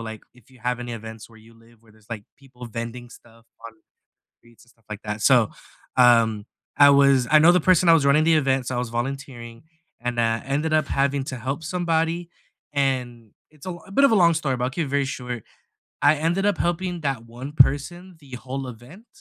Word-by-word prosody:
like, 110 -1 -8
if 125 0 -23
you 130 - -19
have 125 0 -2
any 120 0 -6
events 110 -1 -9
where 115 - -17
you 115 +1 -19
live 115 0 -23
where 110 -2 -22
there's, 110 0 -25
like, 110 -3 -6
people 125 -3 -12
vending 115 +2 -7
stuff 115 -1 -18 0.2
on 115 - -11 0.7
streets, 120 -1 -22
and - - -26
stuff 115 -3 -35
like 105 -1 -7
that. 105 0 -5
So, 120 -1 +4 0.5
um, 115 -4 +4 0.3
I 145 0 +7
was 140 -3 +4
I 155 - +7
know 165 +3 +7
the 180 - +4
person 180 0 +3
that 165 - +8
was 155 -4 +3
running 145 +2 +4
the 165 0 +4
event, 135 -4 +1
so 130 - -3
I - - -1
was 125 -1 -4
volunteering, 120 -1 -6 0.4
and, 120 0 -3
uh, 115 -1 0
ended 145 +4 -1
up 155 -2 +2
having 140 0 0
to 130 - -6
help 135 +6 -4
somebody 170 0 -1 0.4
and 125 -5 -2 0.2
it's 150 -2 -17
a - - -5
l 175 - -10
a - - -14
bit 275 +8 +4
of 275 - +3
a - - +4
long 170 0 +5
story, 150 -5 -1
but 125 - -3
I'll - - -1
keep 165 +3 -2
it - - -9
very 140 0 0
short. 125 -4 -6 0.6
I - - +5
ended 170 +6 0
up 205 -3 +1
helping 175 +1 -2
that 135 -6 -3
one 125 +5 -9
person 165 +6 +1
the 140 -3 -18
whole 130 +2 -6
event, 125 - -13
130 Hz, 225 wpm, -23 LUFS, 115-155 Hz, 0.7 s, that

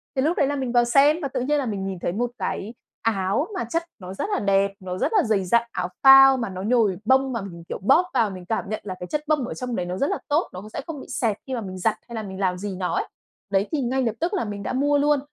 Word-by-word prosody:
Thì 265 - +1
lúc 315 +6 +1
đấy 280 - +3
là 290 - -1
mình 260 -3 -2
vào 240 0 +4
xem 280 +6 +5
và 280 - -1
tự 260 -2 -3
nhiên 295 +4 +1
là 280 - -1
mình 200 -4 -3
nhìn 190 -2 -4
thấy 170 - -2
một 240 +6 -2
cái 215 -2 -3 0.3
áo 210 - 0
mà - - -1
chất 330 +9 -2 0.2
nó 185 -1 -8
rất 195 - -3
là - - +1
đẹp, 200 0 +2
nó 185 -1 -5
rất - - 0
là 410 -5 +4
dày 210 -5 +1
dặn, 235 +5 +2
áo 180 - -2 0.2
phao 270 0 +9
mà 230 -4 -3
nó 185 -1 -6
nhồi 215 -3 +2
bông 265 +2 +3
mà 230 - -2
mình, 170 -4 -9
kiểu, - - -3
bóp 340 - +5
vào 225 -3 +2
mình 185 -2 -9
cảm 220 +1 -2
nhận 215 - -3
là 190 -3 -5
cái 180 - -6
chất 300 - -2
bông 295 -5 +1
ở - - -5
trong 250 -2 -4
đấy 180 - -2
nó 180 +1 -4
rất 280 - +1
là - - -1
tốt, 300 +4 +1
nó 185 - -7
cũng 210 - -11
sẽ 250 - -5
không 310 -5 -6
bị - - -11
xẹp 230 -6 0
khi 265 - -4
mà 240 - -2
mình 185 -3 -7
giặt, 215 +4 +1
hay 235 - -7
là 220 - -3
mình 190 -2 -7
làm 185 -2 0
gì 200 +1 -5
nó 180 -1 -2
ấy. 405 +3 -1 0.4
Đấy, 195 +1 +2
thì 305 -3 0
ngay 260 +1 0
lập 225 -3 0
tức 345 +5 -1
là 385 - 0
mình 205 -1 -5
đã - - -3
mua 290 +3 +2
luôn. 290 0 +3
230 Hz, 315 wpm, -24 LUFS, 195-270 Hz, 0.4 s, phao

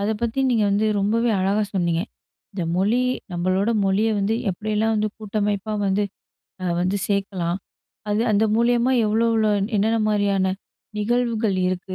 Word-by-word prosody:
அத 205 +2 0
பத்தி 235 +3 0
நீங்க 225 -3 +2
வந்து 210 +2 +2
ரொம்பவே 230 +4 +1
அழகா 200 +3 +1
சொன்னீங்க. 170 -2 +1 0.5
இந்த 190 -3 -3
மொழி 210 +7 +2 0.3
நம்பளோட 185 +5 0
மொழிய 200 +3 +2
வந்து, 200 +3 +1 0.2
எப்படியெல்லாம் 215 +3 -1
வந்து 215 0 +1
கூட்டமைப்பா 210 0 -2
வந்து 200 +2 +1 0.6
அ - - -3 0.2
வந்து 185 +3 0
சேக்கலாம். 195 -3 -1 0.5
அது 210 +2 +1
அந்த 210 +2 +3
மூலியமா 240 +2 +2
எவ்வளோ 220 +2 +2
எவ்வளோ 220 -1 +2 0.3
என்னென்ன 220 +3 +2
மாரியான 200 -2 +1 0.4
நிகழ்வுகள் 225 -2 0
இருக்கு? 185 +1 -4
210 Hz, 140 wpm, -22 LUFS, 195-225 Hz, 0.6 s, அந்த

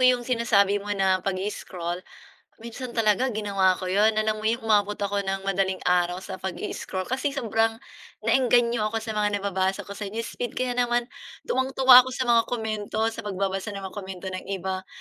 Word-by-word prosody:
'yong 250 -1 +4
sinasabi 210 -5 +2
mo 205 - -9
na 190 -1 +2
pag-i-scroll, 185 -2 -4 0.6
minsan 235 +1 -7
talaga 225 +2 +2
ginawa 200 -3 +2
ko 185 0 -5
'yon, 210 +3 +4
alam 215 0 0
mo 215 - -3
'yong 230 +2 0
umabot 210 -2 +2
ako 200 -1 -2
ng 195 0 -2
madaling 195 -1 -1
araw 180 0 +1
sa 190 -1 -7
pag-i-scroll, 185 0 -4
kasi 265 +7 -2
sobrang 225 -4 +1 0.5
na-engganyo 235 -1 +3
ako 225 +1 -2
sa 225 - -5
mga 210 -1 0
nababasa 190 -1 0
ko - - -14
sa 200 +1 -5
newsfeed, 230 +3 -5
kaya 250 -1 -2
naman, 240 0 +1 0.4
tuwang-tuwa 260 - +6
ako 260 - -5
sa 260 - -1
mga 230 -1 +6
komento, 220 -2 -3
sa 225 -1 -8
pagbabasa 195 +1 -2
ng 195 - -6
mga 190 - -7
komento 190 -2 -7
ng 185 0 -6
iba. 190 -1 -4
210 Hz, 175 wpm, -25 LUFS, 190-235 Hz, 0.6 s, tuwang-tuwa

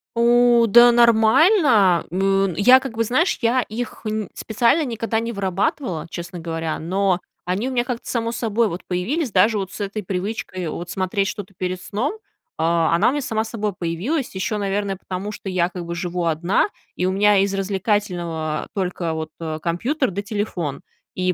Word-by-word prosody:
У 240 0 +5
да, 240 +3 +8
нормально, 235 - +5
м, 195 0 +1
я 250 +8 +7
как 260 -3 -6
бы, 230 - +2
знаешь, 260 - +1
я 240 +2 +3
их 235 +1 -6
нь 215 -1 -2
специально 235 +8 +1
никогда 230 -3 -2
не 230 +1 -3
вырабатывала, 190 - -2
честно 170 +1 -7
говоря. 165 -1 -3
Но 185 +2 0 0.3
они 190 +8 -1
у - - -5
меня 245 -2 +1
как-то 245 -1 -5
само 230 -1 -1
собой 230 -1 0
вот 175 +1 -5
появились. 235 - -1
Даже 210 +4 +4
вот 190 -1 -4
с - - -9
этой 205 +1 -3
привычкой, 185 -1 -4
вот 175 +2 -5
смотреть 190 +2 -1
что-то 200 -2 -6
перед 185 0 -3
сном, 225 - -2 0.4
а, 165 0 +2
она 195 +7 +4
у - - +1
меня 290 +1 -2
сама 225 -4 -1
собой 215 -2 -3
появилась, 190 - -2
еще, 210 +3 -2
наверное, 200 -1 -2
потому 190 +3 -5
что 205 - -9
я 180 -2 +1
как 180 -1 -7
бы 170 0 -4
живу 175 0 -3
одна, 165 - +1 0.3
и 180 - -1
у 185 - +1
меня 205 +1 +4
из 195 0 +2
развлекательного 190 -5 -1
только 180 -3 -2
вот, 160 0 -4
а, 160 -2 -4
компьютер, 230 - -1
да 195 +3 -3
телефон. 205 - -3 0.3
И 185 0 0
200 Hz, 180 wpm, -21 LUFS, 180-230 Hz, 0.4 s, да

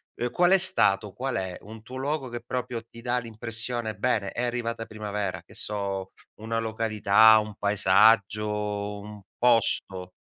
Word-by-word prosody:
ehm, 120 - -2
qual 175 +1 +3
è 195 - +7
stato? 105 - +2
Qual 135 +5 -3
è 95 -1 -4
un 110 +2 -11
tuo 125 +4 -11
luogo 135 0 -2
che 120 0 -6
proprio 125 -2 -4
ti 115 0 -14
dà 120 +1 0
l'impressione: 115 0 -4
"Bene, 105 -1 0
è 125 - -3
arrivata 115 -2 -2
primavera", 105 -4 -4
che - - -18
so, 100 -2 -3 0.2
una 115 +1 -3
località, 110 -1 +4
un 105 -1 -5
paesaggio, 105 0 +2
un 105 0 -10 0.2
posto 100 -6 +1
110 Hz, 150 wpm, -26 LUFS, 105-120 Hz, 0.2 s, è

